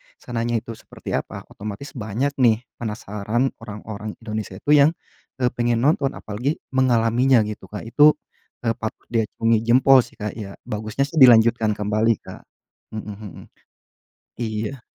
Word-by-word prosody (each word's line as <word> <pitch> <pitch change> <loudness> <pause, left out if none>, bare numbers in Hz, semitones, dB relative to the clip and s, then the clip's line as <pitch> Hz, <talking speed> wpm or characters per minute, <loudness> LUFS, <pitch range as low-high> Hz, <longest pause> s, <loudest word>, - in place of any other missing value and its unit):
sananya 120 0 -3
itu 115 - -8
seperti 110 - -10
apa, - - -3
otomatis 105 +6 -7
banyak 120 +4 -2
nih, 115 -2 +4 0.2
penasaran, 110 +2 -2
orang-orang 105 0 -7
Indonesia 110 -4 -5
itu 145 - -1
yang, 150 +1 +6 0.5
eee, 125 -1 +2
pengen 120 -1 0
nonton, 140 -1 +2
apalagi 120 +9 -3 0.2
mengalaminya 125 -1 +3
gitu 105 0 -7
Kak, 105 - -7
itu, 150 +5 +6 0.5
e 115 - +2
patut 110 - -6
diacungi 115 0 +1
jempol 130 +2 +6
sih - - -18
Kak 105 -1 -3
ya, 100 -3 -8
bagusnya 110 +5 -2
sih 160 - -1
dilanjutkan 115 -3 +6
kembali 105 +2 +2
Kak. - - -10 0.5
Hmm 110 - -4 0.2
hmm. 105 -5 -10 1.0
Iya. 110 +3 -3
115 Hz, 140 wpm, -22 LUFS, 105-125 Hz, 1.0 s, yang